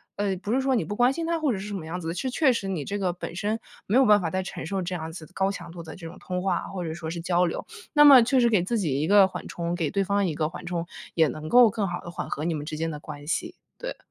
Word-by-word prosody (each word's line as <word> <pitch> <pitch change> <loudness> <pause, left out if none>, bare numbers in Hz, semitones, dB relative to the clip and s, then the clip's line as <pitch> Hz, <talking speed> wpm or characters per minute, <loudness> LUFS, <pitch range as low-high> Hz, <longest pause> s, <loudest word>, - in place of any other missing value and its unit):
呃， 200 -1 0
不 200 +4 -3
是 265 - +2
说 265 0 +1
你 225 -10 +1
不 205 - -4
关 245 +3 +4
心 330 +4 -3
她 335 0 +1
或 295 -4 +2
者 205 - -2
是 195 - -6
什 210 - -5
么 185 -5 -5
样 170 +3 -4
子 165 - -6
的， 165 - -2
是 220 +9 -2
确 265 +1 +3
实 195 -4 -3
你 165 -7 -3
这 205 - -3
个 190 -3 0
本 175 -1 -7
身 215 +3 -1 0.3
没 215 - +3
有 265 - +6
办 210 -3 +6
法 165 - -1
再 185 +3 -1
承 185 - -6
受 190 +3 -2
这 180 0 -3
样 160 -1 -5
子 160 -2 -9
高 195 0 +1
强 200 - -8
度 170 0 -9
的 160 -2 -9
这 165 -3 -8
种 170 +3 -11
通 180 -1 -4
话， 190 - +1
或 185 -3 -5
者 160 - -3
说 160 -1 -6
是 170 +1 -4
交 175 +1 +2
流。 170 - -3 0.3
那 295 -1 +6
么 270 -4 +10
确 260 +3 +2
实 240 - +5
给 205 -6 +3
自 230 +6 -1
己 145 -8 0
一 - - +1
个 200 +2 +6
缓 190 - -7
冲， 170 0 -3
给 165 -4 -1
对 200 - +1
方 200 +1 +1
一 170 - -1
个 155 0 0
缓 175 +2 -9
冲， 170 -1 -3 0.3
也 160 -2 +5
能 155 +3 -6
够 245 -2 +7
更 205 -3 -2
好 175 - -3
地 - - -9
缓 175 - -5
和 150 - -3
你 170 - 0
们 150 -2 -4
之 155 0 -5
间 165 +1 -1
的 150 -2 -6
关 145 -1 -9
系。 165 - -2 0.2
对。 - - -6
180 Hz, 355 characters per minute, -26 LUFS, 165-210 Hz, 0.3 s, 么